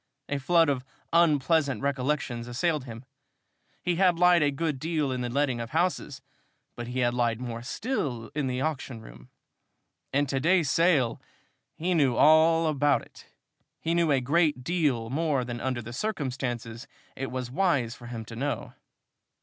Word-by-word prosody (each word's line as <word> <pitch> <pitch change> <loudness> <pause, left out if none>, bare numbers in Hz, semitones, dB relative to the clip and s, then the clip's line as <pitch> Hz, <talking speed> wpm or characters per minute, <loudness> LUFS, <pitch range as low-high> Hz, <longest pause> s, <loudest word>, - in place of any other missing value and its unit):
A 145 - -1
flood 165 +4 +4
of 135 -3 0 0.3
unpleasant 150 -5 +3
recollections 135 -3 -1
assailed 150 +3 -1
him. 115 0 -9 0.8
He 175 -1 0
had 180 -2 +4
lied 180 -1 +5
a 145 - +3
good 145 0 -2
deal 155 -2 -1
in 125 -1 -2
the 120 - -2
letting 130 -2 0
of 115 - -6
houses, 160 -4 -1 0.5
but 120 -1 -6
he 125 +1 -2
had 120 -1 +2
lied 120 -2 0
more 120 -2 -5
still 135 - -3
in 145 -3 -1
the 125 0 -2
auction 135 -5 -3
room. - - -14 0.8
And 145 +1 +1
to 135 0 -1
day's 165 -1 +3
sale! 155 -9 +2 0.5
He 180 +3 -1
knew 140 -7 +3
all 160 +3 +5
about 145 -2 +2
it! - - -16 0.5
He 165 - -1
knew 170 -2 +2
a 135 -2 +3
great 145 0 +1
deal 140 -9 0
more 145 -3 0
than 120 -1 -5
under 125 -2 -2
the 120 +2 -8
circumstances 125 - -3 0.3
it 135 0 -4
was 125 -1 -4
wise 140 -8 +1
for 120 -1 -12
him 115 -2 -6
to 115 - -9
know! 140 +5 -3
135 Hz, 165 wpm, -27 LUFS, 120-160 Hz, 0.8 s, lied